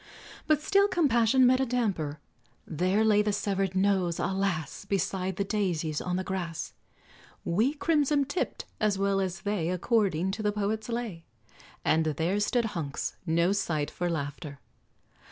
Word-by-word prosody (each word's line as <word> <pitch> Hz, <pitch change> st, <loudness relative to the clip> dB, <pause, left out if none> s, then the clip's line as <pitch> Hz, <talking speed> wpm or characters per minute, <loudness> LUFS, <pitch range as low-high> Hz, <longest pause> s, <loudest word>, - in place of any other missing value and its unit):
But 305 Hz, -1 st, +2 dB
still 395 Hz, +5 st, +4 dB
compassion 260 Hz, -, +3 dB
met 255 Hz, +1 st, +5 dB
a 265 Hz, -, +2 dB
damper; 195 Hz, -12 st, -1 dB, 0.5 s
There 185 Hz, +7 st, +1 dB
lay 210 Hz, -1 st, +5 dB
the 210 Hz, 0 st, 0 dB
severed 195 Hz, -2 st, -1 dB
nose, 190 Hz, -3 st, +2 dB
alas! 190 Hz, -4 st, -2 dB
Beside 190 Hz, -1 st, -1 dB
the 200 Hz, -, 0 dB
daisies 175 Hz, -7 st, -1 dB
on 180 Hz, 0 st, -2 dB
the 185 Hz, -, -1 dB
grass, 180 Hz, -4 st, -4 dB, 0.7 s
"Wee, 225 Hz, -, +1 dB
crimson 295 Hz, -2 st, +2 dB
tipt" 285 Hz, +7 st, -3 dB
as 210 Hz, -2 st, +1 dB
well 195 Hz, 0 st, +1 dB
as 185 Hz, -1 st, -3 dB
they, 200 Hz, -5 st, -1 dB
According 190 Hz, -2 st, +1 dB
to 215 Hz, -, -4 dB
the 210 Hz, -1 st, +1 dB
poet's 210 Hz, +2 st, -2 dB
lay: 230 Hz, -8 st, -4 dB, 0.6 s
And 160 Hz, +1 st, +3 dB
there 165 Hz, +6 st, 0 dB
stood 235 Hz, +3 st, +1 dB
Hunks, 150 Hz, -5 st, -3 dB
no 170 Hz, +3 st, +3 dB
sight 160 Hz, -7 st, -1 dB
for 175 Hz, 0 st, -2 dB
laughter. 145 Hz, -2 st, -4 dB
195 Hz, 150 wpm, -28 LUFS, 170-220 Hz, 0.7 s, met